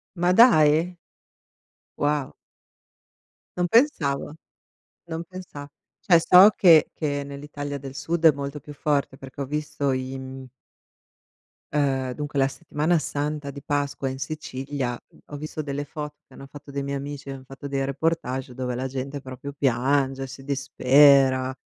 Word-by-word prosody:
Ma 175 0 +2
dai! 175 -6 +5 1.0
Wow. 145 -1 0 1.2
Non 180 0 +1
pensavo. 160 - +2 0.7
Non 165 0 -4
pensa 175 -5 -9 0.4
Cioè 175 -4 +6
so 180 +4 +8
che 165 -5 +6
che 145 -2 -2
nell'Italia 145 0 -6
del 135 -1 -9
Sud 165 +4 -2
è 160 - +9
molto 140 +1 -6
più 150 +1 -11
forte 140 -2 -1
perché 135 +1 -9
ho 140 - -1
visto 145 -1 -2
i 130 0 -3
m 130 0 -8 1.3
Uhm, 135 -3 0
dunque 145 -1 -5
la 135 0 +3
Settimana 160 +2 0
Santa 145 0 -3
di 140 0 -8
Pasqua 145 -2 -2
in 130 - -6
Sicilia, 135 -3 -4
mhmm, - - -22
ho 145 - -7
visto 155 +1 -5
delle 145 -1 -4
foto 150 0 -7
che - - -20
hanno 135 - -11
fatto 145 +1 -13
dei 140 0 -3
miei 140 0 -3
amici, 140 0 -7
han 135 -1 -8
fatto 135 +2 -9
dei 135 -1 -1
reportage 135 -3 -2
dove 125 -1 -3
la 130 +2 -2
gente 135 +2 -5
proprio 130 +2 -8
piange, 135 0 +1
si 135 +1 -10
dispera, 135 -1 +4
140 Hz, 150 wpm, -24 LUFS, 135-150 Hz, 1.3 s, è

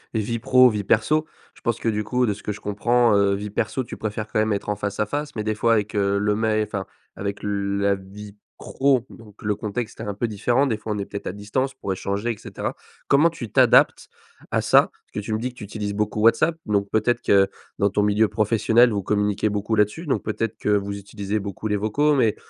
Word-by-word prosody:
vie 110 +2 -1
pro, 130 +1 +6
vie 105 -3 -2
perso 150 +10 +2 0.3
je - - -21
pense 115 -1 0
que 115 - 0
du 105 -1 -1
coup, 125 +4 +1
de 105 - 0
ce 105 - -12
que - - -3
je 105 - -7
comprends, 120 +3 +2
heu, 100 -1 +3
vie 105 +1 -5
perso 115 +5 -1
tu - - -8
préfères 110 0 -4
quand 105 - -1
même 110 0 +2
être 100 - -3
en 105 - 0
face-à-face, 105 +8 -3
mais 105 - -2
des 110 0 -1
fois 115 +2 +2
avec, 105 -1 0
heu, 100 -1 +2
le 105 +1 +1
mais 110 0 +1
enfin, 100 -2 -4 0.3
avec 100 0 -4
la 100 0 0
vie 100 +2 -11 0.2
pro 130 -3 +1
donc 105 -3 -15
le 105 0 0
contexte 110 +2 -5
est - - -4
un 105 -2 -3
peu 110 +4 -2
différent. 120 +6 +1
Des 115 - 0
fois, 110 0 -6
on - - -3
est 100 - -3
peut-être 100 - -7
à - - -1
distance 105 +7 -2
pour 100 -7 -4
échanger 100 +5 -2
et 115 - -6
cetera. - - -5 0.3
Comment 150 +4 +5
tu 135 -9 -8
t'adaptes - - +4 0.4
à - - +2
ça? - - +4
Parce - - -35
que - - -3
tu 110 - -6
me 110 - 0
dis 125 +3 -3
que - - -26
tu - - -7
utilises 105 0 -4
beaucoup 105 +1 -1
WhatsApp, 115 +9 +3
donc 100 -1 0
peut-être 120 +3 +1
que 100 -4 +4 0.3
dans 100 - +3
ton 105 - +1
milieu 105 +1 +3
professionnel 115 +3 +3
vous 100 -1 -1
communiquez 105 +1 0
beaucoup 105 +1 -1
là-dessus? 105 - 0
Donc, 125 -7 0
peut-être 110 0 -3
que - - -6
vous 100 -1 0
utilisez 100 +1 -4
beaucoup 100 +1 -5
les 105 - +1
vocaux, 145 +9 +2
mais 115 -6 +2
105 Hz, 235 wpm, -23 LUFS, 100-115 Hz, 0.4 s, pro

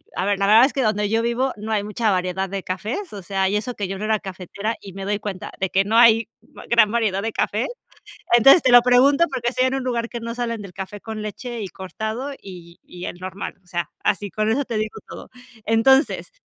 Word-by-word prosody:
a 185 - -1
ver, 205 0 +1
la 195 - +2
verdad 225 +4 +7
es 275 - -1
que 275 - 0
donde 210 -3 +1
yo 225 +1 +1
vivo 235 +3 0
no 215 +2 -6
hay 205 - 0
mucha 210 +2 -1
variedad 185 +1 -1
de 195 -1 -4
cafés, 215 - -4
o 200 - -7
sea, 190 +1 0
y 205 - -1
eso 235 +4 -4
que 200 -4 -4
yo 195 - -4
no 210 - -6
era 215 0 +1
cafetera 195 +3 -5
y 195 - -10
me 195 +1 -7
doy 205 +1 -1
cuenta 200 -3 -6
de 190 - 0
que 195 +2 +2
no 220 - -1
hay 230 -2 +6 0.3
va - - -9
gran 230 -3 +5
variedad 215 -4 0
de 225 +2 -2
café. 215 +4 -1 0.7
Entonces 270 +8 +7
te 255 - +3
lo 245 - +9
pregunto 265 +6 +5
porque 240 -2 -1
estoy 255 +1 +1
en 260 - -2
un 265 - -3
lugar 235 -2 -1
que 235 - -6
no 230 0 -5
salen 235 -2 -3
del 190 -2 -10
café 195 +2 -7
con 220 0 -6
leche 235 +3 -6
y 195 - -4
cortado 220 +9 -5
y 175 -3 -12
y 180 0 -10
el - - -7
normal, 190 +2 -6
o - - -33
sea, 175 -3 -3
así 205 0 0
con 215 +4 -1
eso 275 +6 +1
te 235 -3 -4
digo 215 0 -3
todo. - - -10 0.4
Entonces, 265 - +3
215 Hz, 250 wpm, -22 LUFS, 195-235 Hz, 0.7 s, lo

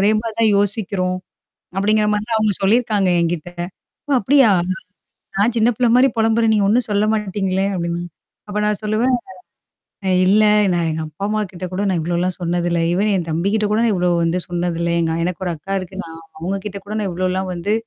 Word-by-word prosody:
ஒரே 200 +2 +4
மாரி 225 -1 -5
தான் 220 -2 +4
யோசிக்கிறோம். 195 -3 0 0.6
அப்படிங்கிற 210 +2 +2
மாரிலாம் 215 +2 -1
அவுங்க 215 -2 +2
சொல்லியிருக்காங்க 210 -2 +2
என்கிட்ட. 170 0 -2 0.6
"ஒ - - 0
அப்படியா? 265 +2 +4 0.9
நான் 220 +4 +2
சின்ன 230 0 +3
பிள்ளை 245 -2 +3
மாரி 255 +2 +6
பொலம்புறேன். 225 0 +3
நீ 210 - +2
ஒண்ணும் 235 +3 +3
சொல்ல 205 0 +2
மாட்டீங்களே" 195 -2 -1
அப்டின்னா 170 0 -2 0.5
அப்ப 210 +1 -2
நான் 210 -1 0
சொல்லுவேன்! 225 +4 +1 0.9
"அ - - -1 0.2
இல்ல. 205 +3 +4 0.3
நான் 170 -1 0
எங்க 160 0 -3
அப்பா 155 +6 -9
அம்மா 215 +1 0
கிட்ட 185 0 -6
கூட 185 +2 -2
நான் 180 -3 0
இவ்வளோலாம் 175 +2 -1
சொன்னதில்ல. 175 0 0
ஈவன் 205 +4 +1
என் 175 -3 -2
தம்பிகிட்ட 200 +7 0
கூட 215 - +2
நான் 230 -2 +2
இவ்வளோ 180 0 +1
வந்து 165 +2 0
சொன்னதில்ல. 170 -1 -1
எங்க 160 -1 0
எனக்கு 180 +1 -3
ஒரு 175 - 0
அக்கா 195 +6 -4
இருக்கு. 185 0 -9
நான் 165 0 -10 0.2
அவுங்ககிட்ட 195 +4 -4
கூட 205 - -6
நான் 200 -3 -1
இவ்வளோலாம் 185 +1 -1
வந்து 180 +5 -1
195 Hz, 180 wpm, -19 LUFS, 175-215 Hz, 0.9 s, மாரி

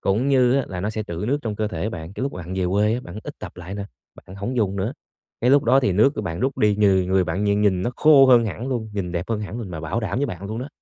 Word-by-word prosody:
cũng 110 +8 +1
như 125 -3 +4
á 140 - +2
là 90 -1 -5
nó 105 +3 -1
sẽ 110 0 -3
trữ 85 -1 -5
nước 140 +3 +1
trong 110 -3 -3
cơ 110 -1 -1
thể 110 - -3
bạn. 80 -2 -7
Cái - - -6
lúc 140 - -2
bạn 90 +1 -6
về 95 -1 0
quê, 105 +4 +2
bạn 105 -3 -9
ít - - -7
tập - - -8
lại 90 +2 -7
nè, 100 -1 -4 0.4
bạn 95 - -11
hổng 120 +6 -4
dùng 100 -4 0
nữa, 100 +7 -2 0.5
cái 125 - +3
lúc 140 -1 +5
đó 130 +4 +5
thì 100 -8 +1
nước 110 +9 +4
của - - -3
bạn 85 +1 -4
rút 135 +1 -1
đi, 105 -1 +3
người 95 -3 +3
người 95 0 +2
bạn 90 +5 -2
nhìn 100 0 +2
nhìn 95 -3 +2
nó 120 - -1
khô 145 -3 +7
hơn 120 -2 +6
hẳn 110 +3 -4
luôn, 115 -4 -3
nhìn 90 -4 -3
đẹp 90 +4 -3
hơn 110 -2 -1
hẳn 105 +2 -5
luôn, 105 -6 -6
mà 80 - -6
bảo 80 +9 -2
đảm 110 +1 -2
với 145 - +1
bạn 95 -2 -6
luôn 110 +2 -4
đó. 130 +4 -5
105 Hz, 315 wpm, -22 LUFS, 95-120 Hz, 0.5 s, khô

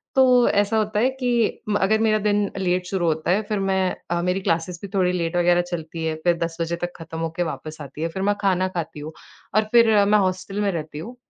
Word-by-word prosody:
तो 265 - +6 0.3
ऐसा 205 +2 +2
होता 215 -1 0
है 250 +4 +3
कि 240 -3 0
म 205 - +1
अगर 215 +3 +3
मेरा 220 -1 +3
दिन 205 -1 +1
लेट 180 -1 0
शुरू 185 -2 -1
होता 160 +1 0
है, 200 +4 +2
फिर 210 -2 0
मैं 190 -1 0 0.2
अ, 170 0 +1
मेरी 180 +2 0
क्लासेस 170 0 -1
भी 200 - -6
थोड़ी 185 -2 +3
लेट 170 -1 -2
वग़ैरह 175 0 +4
चलती 165 -2 -6
है 160 -1 -1
फिर 175 -1 +3
10 165 0 -4
बजे 165 +1 -1
तक 175 0 -2
खत्म 165 -1 -8
होके 165 +1 -2
वापस 155 -1 -6
आती 145 +1 -9
है। - - +1
फिर 190 +3 -5
मैं 205 +1 +2
खाना 185 -2 +2
खाती 165 -4 -5
हूँ 155 +2 -7 0.4
और 215 - +5
फिर 230 -1 +6 0.2
मैं 210 +1 +4
हॉस्टल 190 +1 -2
में 200 -1 +1
रहती 155 -3 -5
हूँ। 230 +10 -8
180 Hz, 240 wpm, -23 LUFS, 165-205 Hz, 0.4 s, तो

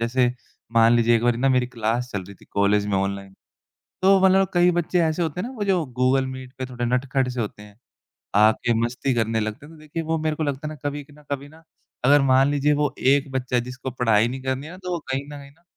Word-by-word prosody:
जैसे 125 +2 +2 0.5
मान 115 0 +5
लीजिए 120 0 +3
एक 115 - -2
बारी 120 -1 +2
ना 135 +2 +2
मेरी 125 -2 +2
क्लास 120 +1 -2
चल 100 - -3
रही 100 +2 -12
थी - - -20
कॉलेज 100 0 +2
में 100 -1 0
ऑनलाइन, 100 0 -3 0.7
तो 195 +1 +5
मतलब 190 0 +5
अब 195 - +1
कई 175 0 +4
बच्चे 175 +1 0
ऐसे 160 +2 0
होते 165 +1 -2
हैं 230 - -4
ना, 265 - -9
वो 215 - -3
जो 185 -5 +1
गूगल 130 +1 +1
मीट 130 0 -8
पे 130 - -3
थोड़े 125 -1 -4
नटखट 125 +2 0
से 125 0 -5
होते 105 -1 -6
हैं, 105 -1 -16 0.6
आके 110 +3 +3
मस्ती 125 +2 -1
करने 115 -1 0
लगते 110 +6 -5
हैं, 160 - -14
तो 155 - -16
देखिए 155 +2 -5
वो 160 0 -1
मेरे 155 -1 -1
को 160 - -3
लगता 145 0 -3
है - - -6
ना - - -12
कभी 145 0 -6
कि 145 - -20
ना 150 +1 -18
कभी 140 0 -4
ना 160 +2 -18 0.4
अगर 145 +2 +6
मान 135 +1 +4
लीजिए 145 +1 +2
वो 145 -2 -1
एक 140 +1 +2
बच्चा 125 -1 -1
जिसको 125 +2 -5
पढ़ाई 115 -3 +2
नहीं 130 +2 -6
करनी 130 +2 -3
है 160 - -9
ना, 180 - -11
तो 180 -1 -5
वो 175 - -1
कहीं 135 +1 -1
न - - -12
कहीं 140 0 -12
ना 145 - -28
130 Hz, 265 wpm, -23 LUFS, 120-150 Hz, 0.7 s, अगर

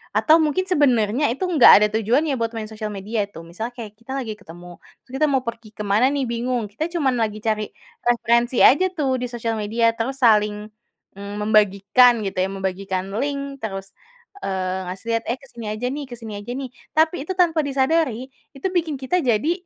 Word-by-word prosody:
atau 315 +1 +5
mungkin 310 +5 0
sebenarnya 265 - +2
itu 275 +10 -2
enggak 320 -8 +7
ada - - +4
tujuannya 270 +7 +1
buat 230 -1 -1
main 220 -1 -4
sosial 215 0 -6
media 205 +2 -2
itu. 200 - -12
Misalnya 220 +8 -5
kayak 220 -4 -8
kita 230 +3 -11
lagi 235 -5 -4
ketemu, 175 -1 -12 0.3
terus 255 - -16
kita 305 +2 +3
mau 270 - +3
pergi 230 -1 -6
kemana 210 +4 +2
nih, 280 -2 -1
bingung. 235 -1 -2
Kita 265 +10 -3
cuma 325 -6 +1
lagi 215 -3 -1
cari 215 -2 -1 0.3
referensi 235 0 +2
aja 345 +8 +6
tuh 285 -7 -1
di 250 - -2
sosial 230 -1 -2
media, 230 +2 +1
terus 265 +4 -3
saling, 210 -2 +3 0.5
mmm, 200 +1 -7
membagikan 210 +3 +4
gitu 195 - -4
ya, 190 - 0
membagikan 190 -1 -3
link 280 -2 -4
terus, 195 -2 -6 0.5
eee, 190 -1 -2
ngasih 190 +4 -10
lihat, 230 - -1
"Eh, 240 - -1
kesini 240 -5 -11
aja 215 +4 -3
nih 285 +3 -4
kesini 225 -3 -8
aja 205 +4 -8
nih." 270 -2 -5 0.3
Tapi 315 +2 +3
itu - - -2
tanpa 330 -3 +3
disadari, 270 -2 0 0.3
itu 275 +7 -3
bikin 335 -5 -1
kita 340 +7 0
jadi, 245 +5 +1
235 Hz, 185 wpm, -22 LUFS, 210-275 Hz, 0.5 s, enggak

